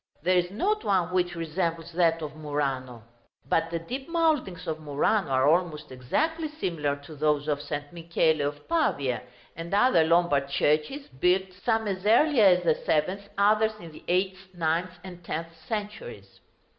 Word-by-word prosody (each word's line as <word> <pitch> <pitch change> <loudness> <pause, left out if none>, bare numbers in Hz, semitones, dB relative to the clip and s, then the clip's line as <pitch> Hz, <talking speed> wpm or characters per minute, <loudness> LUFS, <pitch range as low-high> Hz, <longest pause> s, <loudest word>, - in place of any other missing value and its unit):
There 185 0 +3
is 175 0 -2
not 405 - -1
one 185 -3 +1
which 175 -1 0
resembles 165 0 -3
that 165 -1 +2
of 150 0 -6
Murano. 135 -6 -3 0.4
But 165 +3 +1
the 170 - -2
deep 255 - -6
mouldings 315 - 0
of 155 -1 -3
Murano 155 +5 0
are 130 +1 +3
almost 160 -2 +1
exactly 315 - -1
similar 170 - -2
to 155 - -11
those 150 0 +1
of 145 -1 0
St. 145 +1 -5
Michele 165 -2 +1
of 145 0 -7
Pavia, 140 - 0 0.3
and 165 +1 -7
other 205 -6 +5
Lombard 160 -4 +2
churches 155 - 0
built, 180 +7 0
some 220 +3 -1
as 190 -2 -3
early 250 +3 +5
as 180 -3 +5
the 165 -2 +4
seventh, 185 +8 -1
others 215 +2 +3
in 170 -3 -10
the 155 - -14
eighth, 190 +1 0
ninth, 170 +2 -1
and 180 -2 -10
tenth 165 0 -4 0.2
centuries. 205 - -6
170 Hz, 160 wpm, -27 LUFS, 150-200 Hz, 0.4 s, other